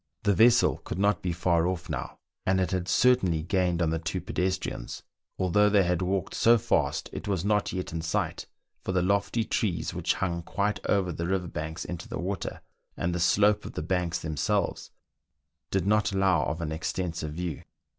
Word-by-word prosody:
The 100 Hz, -, +3 dB
vessel 115 Hz, +4 st, +5 dB
could -, -, -6 dB
not 100 Hz, 0 st, +2 dB
be 90 Hz, -, -1 dB
far 85 Hz, 0 st, +2 dB
off 90 Hz, -2 st, -3 dB
now, -, -, -5 dB, 0.3 s
and 95 Hz, 0 st, +2 dB
it 90 Hz, -3 st, 0 dB
had 90 Hz, -1 st, -1 dB
certainly 95 Hz, -10 st, +3 dB
gained 90 Hz, -1 st, +1 dB
on 80 Hz, -, +1 dB
the 80 Hz, -, 0 dB
two 80 Hz, -, -3 dB
pedestrians, 90 Hz, -9 st, -3 dB, 0.3 s
although 105 Hz, +3 st, +3 dB
they 100 Hz, -1 st, +4 dB
had 90 Hz, 0 st, 0 dB
walked 95 Hz, 0 st, -1 dB
so 120 Hz, +1 st, +5 dB
fast; 105 Hz, -, 0 dB
it -, -, -6 dB
was 95 Hz, -4 st, 0 dB
• -, -, -5 dB
not 105 Hz, 0 st, +1 dB
yet 90 Hz, -3 st, -4 dB
in 80 Hz, -, -2 dB
sight, 80 Hz, 0 st, -2 dB, 0.4 s
for 95 Hz, -, -2 dB
the 90 Hz, -1 st, +2 dB
lofty 100 Hz, +4 st, +1 dB
trees 95 Hz, -5 st, -1 dB
which -, -, 0 dB
hung 85 Hz, -3 st, -1 dB
quite 100 Hz, +4 st, -2 dB
over 95 Hz, -3 st, +2 dB
the 85 Hz, +1 st, -3 dB
river 95 Hz, -1 st, 0 dB
banks 80 Hz, 0 st, -5 dB
into 90 Hz, 0 st, -6 dB
the -, -, -5 dB
water, 95 Hz, +3 st, -4 dB, 0.4 s
and 85 Hz, +1 st, -1 dB
the 90 Hz, -, -1 dB
slope 105 Hz, +4 st, +3 dB
of -, -, -8 dB
the -, -, -4 dB
banks 90 Hz, 0 st, 0 dB
themselves, 80 Hz, +7 st, -1 dB, 0.8 s
did 95 Hz, -2 st, 0 dB
not 105 Hz, 0 st, +2 dB
allow 95 Hz, -6 st, +2 dB
of 80 Hz, +2 st, -3 dB
an 80 Hz, -2 st, -3 dB
extensive 80 Hz, -1 st, -3 dB
view. 85 Hz, -2 st, -4 dB
90 Hz, 195 wpm, -28 LUFS, 85-100 Hz, 0.8 s, vessel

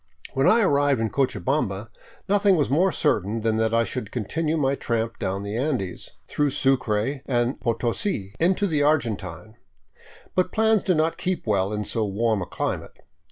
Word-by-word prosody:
When 135 Hz, +1 st, +2 dB
I 230 Hz, +2 st, +5 dB
arrived 145 Hz, -, +3 dB
in 115 Hz, -1 st, -1 dB
Cochabamba 130 Hz, -6 st, -1 dB, 0.4 s
nothing 200 Hz, -1 st, +4 dB
was 145 Hz, -6 st, 0 dB
more 180 Hz, +7 st, +3 dB
certain 110 Hz, -, 0 dB
than 110 Hz, 0 st, +1 dB
that 110 Hz, 0 st, +1 dB
I 115 Hz, 0 st, +3 dB
should 115 Hz, -3 st, -5 dB
continue 155 Hz, +8 st, -1 dB
my 135 Hz, -2 st, +1 dB
tramp 115 Hz, -3 st, -2 dB
down 95 Hz, -1 st, -2 dB
the 100 Hz, +1 st, -4 dB
Andes, 120 Hz, -, -2 dB, 0.2 s
through 145 Hz, -1 st, 0 dB
Sucre 130 Hz, -1 st, 0 dB
and 120 Hz, 0 st, 0 dB
Potosi, 115 Hz, -, -1 dB
into 185 Hz, +4 st, +2 dB
the 155 Hz, -6 st, +1 dB
Argentine. 110 Hz, -, -1 dB, 0.8 s
But 185 Hz, 0 st, +1 dB
plans 220 Hz, -2 st, +3 dB
do 180 Hz, -, +1 dB
not 160 Hz, +1 st, +1 dB
keep 185 Hz, -2 st, -2 dB
well 100 Hz, -3 st, +1 dB
in 105 Hz, 0 st, -2 dB
so 110 Hz, +1 st, -2 dB
warm 105 Hz, +1 st, 0 dB
a 90 Hz, -, -4 dB
climate. -, -, -4 dB
125 Hz, 165 wpm, -24 LUFS, 110-155 Hz, 0.8 s, I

